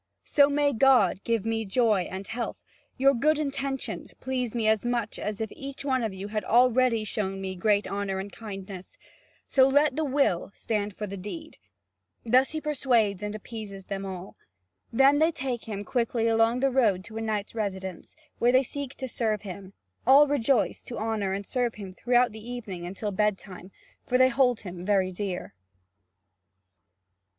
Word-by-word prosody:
So 285 -1 +4
may 285 0 +2
God 230 -7 +4
give 230 -3 0
me 225 0 0
joy 210 -3 +2
and 190 +1 -6
health, 230 +3 -5 0.3
your 275 +1 +5
good 300 +5 +2
intentions 275 -2 -3
please 250 -3 -3
me 225 -2 +1
as 220 -1 +3
much 240 -2 -2
as 210 -1 -4
if 220 -2 -3
each 275 0 -7
one 260 -2 +1
of 225 -3 -1
you 190 +2 -7
had 215 0 -2
already 245 -1 +3
shown 195 -2 -2
me 190 -1 -4
great 205 +2 +2
honour 200 -1 -2
and 195 +1 -5
kindness: 195 -3 -8 0.5
so 265 -1 +4
let 285 0 +3
the 315 - 0
will 275 - +1
stand 210 -2 -2
for 210 - -4
the 200 -1 -6
deed!" 315 - -8 0.7
Thus 255 +3 +4
he 315 - -3
persuades 245 -10 +1
and 210 0 -4
appeases 210 -3 -8
them 195 -1 -4
all. 190 -1 -7 0.5
Then 270 +4 +5
they 320 +2 +4
take 260 -5 -4
him 205 -2 -5
quickly 235 -1 0
along 225 +2 +3
the 275 0 +3
road 215 -8 +2
to 220 +2 -9
a - - -3
knight's 215 -2 -2
residence, 190 -5 -5 0.2
where 240 - +4
they 260 +1 +5
seek 275 +1 -6
to 260 - -5
serve 220 -4 -1
him: 195 0 -8 0.3
all 275 +3 +8
rejoice 275 -4 +1
to 240 - -6
honour 215 -3 -1
and 200 +1 -4
serve 245 -1 -1
him 195 -3 -8
throughout 245 +3 +2
the 220 0 -10
evening 195 -8 -6
until 200 +3 -4
bedtime, 195 -2 -2 0.4
for 250 - +3
they 255 0 +6
hold 250 -2 +2
him 180 -3 -7
very 190 -1 +2
dear. 185 - -4
225 Hz, 175 wpm, -27 LUFS, 200-255 Hz, 0.7 s, all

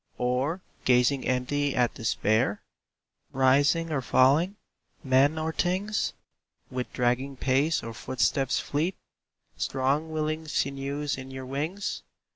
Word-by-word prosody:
Or 130 +8 0 0.2
gazing 130 +2 +3
empty 135 +3 0
at 125 -1 +2
despair? 110 -1 0 0.7
Rising 145 +5 +3
or 140 -3 0
falling? 140 +10 +3 0.5
Men 135 +4 +4
or 160 0 -2
things? 190 +5 0 0.6
With 125 -1 -4
dragging 125 +3 0
pace 140 +5 +1
or 115 - -6
footsteps 130 +2 0
fleet? 160 +6 -1 0.6
Strong, 135 +4 0
willing 155 0 -2
sinews 140 0 -2
in 130 0 -8
your 130 0 -7
wings? 155 +10 -3
135 Hz, 110 wpm, -27 LUFS, 130-155 Hz, 0.7 s, Men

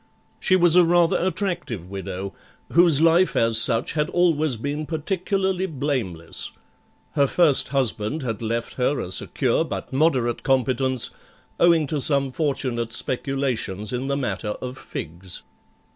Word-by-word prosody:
She 185 - +3
was 175 -2 +5
a 180 - +7
rather 175 +1 +3
attractive 175 - -2
widow, 95 0 -6 0.4
whose 170 -4 +5
life 165 +2 +4
as 115 -1 +3
such 115 - 0
had 150 -2 0
always 155 -6 +2
been 145 +5 -4
particularly 190 +3 -1
blameless; 130 - -3 0.6
Her 140 -2 +2
first 155 -2 +4
husband 130 +1 -1
had 115 -4 -4
left 115 +1 -3
her 135 +3 +1
a 90 - -5
secure - - 0
but - - -6
moderate 130 -5 +1
competence, 130 -1 +1 0.5
owing 170 -3 +4
to 145 0 -2
some 140 -1 +2
fortunate 125 -6 -2
speculations 125 -6 -2
in 125 +2 -2
the 140 0 -1
matter 115 -5 -3
of 125 0 -6
figs. 85 -5 -8
135 Hz, 135 wpm, -23 LUFS, 115-165 Hz, 0.6 s, a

